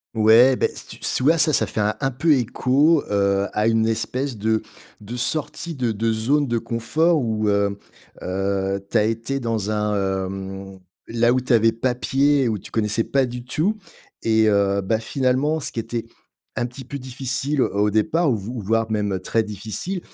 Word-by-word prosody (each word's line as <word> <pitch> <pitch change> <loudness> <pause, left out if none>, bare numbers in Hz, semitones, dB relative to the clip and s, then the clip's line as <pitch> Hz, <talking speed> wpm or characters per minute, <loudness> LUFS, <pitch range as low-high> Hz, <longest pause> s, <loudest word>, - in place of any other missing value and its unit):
Ouais. 115 +4 +6
Beh, - - 0
si - - -10
tu - - -10
si - - -1
tu - - -2
vois, 160 +4 +4
ça, 155 0 +3
ça - - +2
fait 110 - -2
un 105 +1 +1
un 135 - 0
peu 150 +6 +1
écho, 135 +6 +2
heu, 100 0 +2
à 105 +1 +1
une 115 -1 +2
espèce 125 +3 -2
de 110 +1 0 0.4
de 110 +4 -7
sortie 155 +5 -2
de 125 -4 -1
de 110 +1 0
zone 140 +7 +1
de 120 -1 0
confort 155 +9 +1
où 110 -3 0
heu 100 0 +1 0.4
heu, 95 +1 -1
tu - - +1
as - - +4
été 115 +5 -2
dans 110 -3 -2
un, 105 0 0 0.3
hem 95 0 -7 0.3
là 120 +1 +2
où 130 - +1
tu 125 - -4
avais 115 0 +4
pas 125 +2 -1
pied, 135 +2 +2
où 110 -2 0
tu - - -12
connaissais 110 +1 0
pas 135 +2 +1
du 125 0 -6
tout. 165 - -1 0.5
Et 110 -1 +3
heu, 100 -1 +2
bah 110 +3 0
finalement, 135 +6 0
ce 145 - -3
qui 115 - -2
était 115 0 -4 0.5
un 120 - -1
petit 125 +1 -9
peu 140 - -6
difficile, 130 +2 -3
heu, - - 0
au 105 +1 +2
départ, 140 - +1
ou 115 - +1
v 100 +4 -7
voire 115 +2 0
même 105 -3 -1
très 110 +4 0
difficile, 110 - -5
115 Hz, 200 wpm, -22 LUFS, 105-130 Hz, 0.5 s, Ouais